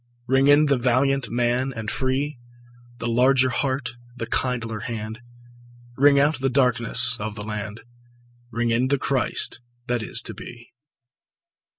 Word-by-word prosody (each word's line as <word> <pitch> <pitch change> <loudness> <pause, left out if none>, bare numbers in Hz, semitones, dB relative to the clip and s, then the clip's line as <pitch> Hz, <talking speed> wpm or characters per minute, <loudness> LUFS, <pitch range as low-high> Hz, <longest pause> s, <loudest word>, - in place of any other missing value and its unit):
Ring 135 +2 +2
in 145 +1 +6
the 140 -2 +2
valiant 130 0 +1
man 120 +2 0
and 110 -1 -4
free, 135 +1 -2 0.6
The 115 - -4
larger 130 +2 +3
heart, 130 0 -2 0.2
the 115 - -5
kindlier 115 -2 -2
hand; 110 -1 -6 0.8
Ring 140 +1 +5
out 145 +1 +2
the 135 +1 0
darkenss 125 -1 +4
of 105 0 -5
the 105 -1 -7
land, 105 0 -6 0.7
Ring 115 0 -1
in 120 +3 +1
the 140 +1 +1
Christ 130 -2 -1 0.3
that 120 -2 -1
is 110 - -1
to - - -5
be. 120 0 -12
125 Hz, 145 wpm, -23 LUFS, 115-135 Hz, 0.8 s, in